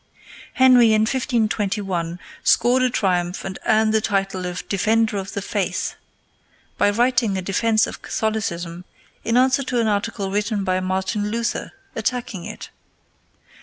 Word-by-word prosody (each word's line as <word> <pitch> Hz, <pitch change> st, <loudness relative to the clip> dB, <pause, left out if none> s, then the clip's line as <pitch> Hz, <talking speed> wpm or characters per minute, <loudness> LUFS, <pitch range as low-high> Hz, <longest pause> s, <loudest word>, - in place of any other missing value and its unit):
Henry, 250 Hz, -4 st, +6 dB
in 215 Hz, -, +4 dB
1521, 210 Hz, -8 st, -1 dB, 0.3 s
scored 245 Hz, +2 st, +4 dB
a 255 Hz, -, +3 dB
triumph 180 Hz, -5 st, -1 dB
and 190 Hz, 0 st, -5 dB
earned 220 Hz, 0 st, +3 dB
the 220 Hz, -, +3 dB
title 195 Hz, -3 st, -1 dB
of 180 Hz, 0 st, -6 dB
Defender 220 Hz, +2 st, +1 dB
of 195 Hz, 0 st, -5 dB
the 200 Hz, -, -3 dB
Faith -, -, -2 dB, 0.9 s
by -, -, +4 dB
writing 235 Hz, -2 st, +2 dB
a -, -, -2 dB
defence 220 Hz, +4 st, +2 dB
of -, -, -8 dB
Catholicism 175 Hz, -6 st, -3 dB, 0.4 s
in 230 Hz, +2 st, +1 dB
answer 260 Hz, +2 st, +4 dB
to 250 Hz, -2 st, -1 dB
an 230 Hz, -, +2 dB
article 205 Hz, -1 st, -1 dB
written 210 Hz, 0 st, -1 dB
by 185 Hz, -1 st, 0 dB
Martin 190 Hz, +3 st, -1 dB
Luther 235 Hz, +2 st, -2 dB, 0.2 s
attacking 225 Hz, -5 st, -3 dB
it. 215 Hz, 0 st, -8 dB
215 Hz, 140 wpm, -22 LUFS, 190-230 Hz, 0.9 s, Henry